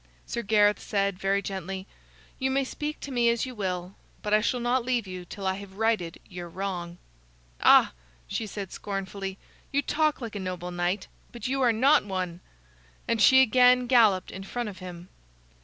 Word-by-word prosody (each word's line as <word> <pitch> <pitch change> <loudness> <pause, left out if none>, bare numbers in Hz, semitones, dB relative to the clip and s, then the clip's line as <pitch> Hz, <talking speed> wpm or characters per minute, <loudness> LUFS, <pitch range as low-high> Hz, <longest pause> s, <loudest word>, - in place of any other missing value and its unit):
Sir 235 - -3
Gareth 210 -1 +3
said, 200 -2 -1
very 195 +1 +1
gently: 190 0 -5 0.5
"You 265 0 +1
may 270 +1 +1
speak 295 +3 -5
to 280 - -6
me 240 -2 +3
as 235 +1 +1
you 255 - -7
will, 185 -4 -3 0.3
but 210 - -1
I 215 - +5
shall 245 +3 0
not 240 +1 +1
leave 245 -3 0
you 185 -1 -7
till 195 +2 -8
I 190 - +2
have 195 -1 -11
righted 215 -7 0
your 175 -2 -8
wrong." 175 -2 -4 0.6
"Ah!" - - +6 0.3
she 220 - -3
said, 200 -2 -6
scornfully, 195 -1 -5 0.3
"you 280 +1 +1
talk 305 0 +1
like 230 -4 -6
a - - -3
noble 180 -1 -4
knight, 175 +3 -1 0.3
but 235 0 -5
you 270 +1 0
are 245 -2 +5
not 260 +7 +4
one," 185 -3 -3 0.7
and 230 -2 +1
she 260 +4 +8
again 250 +1 +5
galloped 225 -7 +4
in 190 - -7
front 240 +3 -4
of 190 -4 -10
him. 180 -1 -9
205 Hz, 185 wpm, -27 LUFS, 185-240 Hz, 0.7 s, she